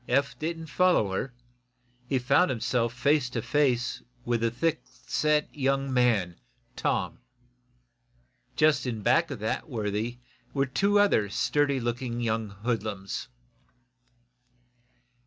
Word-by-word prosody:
Eph 140 Hz, +2 st, +1 dB
didn't 165 Hz, +1 st, -3 dB
follow 165 Hz, -, +2 dB
her. 110 Hz, +7 st, -2 dB, 0.8 s
He 135 Hz, -, +1 dB
found 130 Hz, +8 st, +3 dB
himself 120 Hz, -1 st, 0 dB
face 130 Hz, +2 st, +2 dB
to 120 Hz, -, -3 dB
face 125 Hz, -2 st, +1 dB, 0.2 s
with 120 Hz, -1 st, 0 dB
the 115 Hz, -, +2 dB
thick 155 Hz, +7 st, -1 dB
set 150 Hz, 0 st, 0 dB
young 135 Hz, -1 st, 0 dB
man, 110 Hz, -9 st, +2 dB, 0.4 s
Tom. -, -, -1 dB, 1.4 s
Just 150 Hz, -3 st, +3 dB
of 110 Hz, -4 st, -3 dB
that 135 Hz, -6 st, 0 dB
worthy 110 Hz, 0 st, -2 dB, 0.4 s
were 135 Hz, 0 st, +2 dB
two 200 Hz, +10 st, +2 dB
other 195 Hz, -, +3 dB
sturdy 140 Hz, +5 st, +1 dB
looking 120 Hz, 0 st, -3 dB
young 110 Hz, -2 st, -1 dB
hoodlums. 105 Hz, -2 st, -3 dB
125 Hz, 110 wpm, -28 LUFS, 115-145 Hz, 1.4 s, found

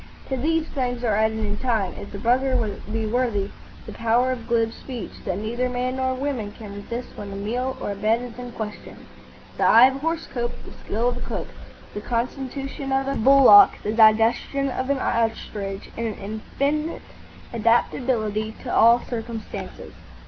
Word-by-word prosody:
To 265 Hz, -, 0 dB
these 320 Hz, +5 st, 0 dB
things 250 Hz, -3 st, -2 dB
are 220 Hz, -4 st, +2 dB
added 220 Hz, +1 st, +1 dB
in 210 Hz, -1 st, -2 dB
time, 225 Hz, -7 st, 0 dB
if 200 Hz, -, -9 dB
the 200 Hz, -, -6 dB
brother 255 Hz, +5 st, +2 dB, 0.4 s
be 225 Hz, 0 st, -1 dB
worthy, 215 Hz, -3 st, 0 dB, 0.3 s
the -, -, -8 dB
power 235 Hz, +3 st, +1 dB
of 240 Hz, -3 st, -5 dB
glib 230 Hz, -1 st, +1 dB
speech 245 Hz, -7 st, -7 dB
that 185 Hz, -1 st, -1 dB
neither 235 Hz, +4 st, -2 dB
man 250 Hz, +1 st, -2 dB
nor 260 Hz, 0 st, 0 dB
woman 255 Hz, -6 st, -3 dB
can 210 Hz, -3 st, -10 dB
resist 235 Hz, +4 st, -6 dB
when 200 Hz, -1 st, -7 dB
a -, -, -6 dB
meal 245 Hz, +6 st, -2 dB
or -, -, -3 dB
a -, -, -4 dB
bed 220 Hz, +4 st, +1 dB
is 245 Hz, 0 st, -9 dB
in 245 Hz, -1 st, -7 dB
question, 215 Hz, -2 st, -7 dB, 0.5 s
the -, -, 0 dB
eye 230 Hz, +3 st, +8 dB
of 265 Hz, +1 st, +2 dB
a -, -, -9 dB
horse 325 Hz, +3 st, -2 dB
cope, 240 Hz, -1 st, -3 dB
the -, -, -11 dB
skill 230 Hz, +4 st, -1 dB
of 245 Hz, -, -4 dB
a -, -, -7 dB
cook, -, -, -4 dB, 0.4 s
the 205 Hz, -, -5 dB
constitution 270 Hz, +4 st, -3 dB
of 270 Hz, 0 st, +1 dB
a 275 Hz, -, 0 dB
bullock, 275 Hz, -, +8 dB
the 210 Hz, -, -1 dB
digestion 225 Hz, +5 st, +4 dB
of 260 Hz, +1 st, -3 dB
an 280 Hz, -, +2 dB
ostrich, 215 Hz, -5 st, -2 dB
and 230 Hz, 0 st, -2 dB
an 215 Hz, -, -4 dB
infinite 280 Hz, +10 st, -3 dB, 0.5 s
adaptability 225 Hz, -1 st, +1 dB
to -, -, -4 dB
all 235 Hz, +2 st, +6 dB
circumstances. 230 Hz, -2 st, -6 dB
235 Hz, 180 wpm, -24 LUFS, 220-260 Hz, 0.5 s, eye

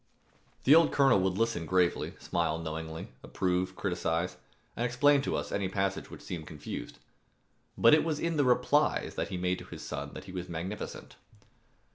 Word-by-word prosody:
The 140 Hz, -, +7 dB
old 165 Hz, -1 st, +6 dB
colonel 135 Hz, -7 st, +5 dB
would 95 Hz, 0 st, 0 dB
listen 115 Hz, -7 st, 0 dB
gravely, 90 Hz, -1 st, +1 dB
smile 85 Hz, -2 st, -1 dB
knowingly, 80 Hz, 0 st, -5 dB
approve, 90 Hz, 0 st, -1 dB
criticize, 85 Hz, -2 st, -1 dB, 0.4 s
and 120 Hz, -, -2 dB
explain 135 Hz, +4 st, +4 dB
to -, -, -1 dB
us -, -, -3 dB
any 100 Hz, -2 st, -1 dB
passage 95 Hz, 0 st, -1 dB
which -, -, -10 dB
seemed 80 Hz, -3 st, -6 dB
confused. 75 Hz, -3 st, -7 dB, 0.8 s
But 115 Hz, -, +6 dB
it 155 Hz, -, +6 dB
was 155 Hz, -2 st, -1 dB
in 170 Hz, -1 st, -1 dB
the 145 Hz, -, +3 dB
replies 130 Hz, +4 st, +2 dB
that -, -, -2 dB
he 95 Hz, -, -3 dB
made 90 Hz, +1 st, 0 dB
to -, -, -10 dB
his -, -, -9 dB
son -, -, -5 dB
that -, -, -7 dB
he 95 Hz, -, -10 dB
was 90 Hz, -1 st, -5 dB
magnificent. 90 Hz, +5 st, -6 dB
95 Hz, 175 wpm, -30 LUFS, 85-125 Hz, 0.8 s, The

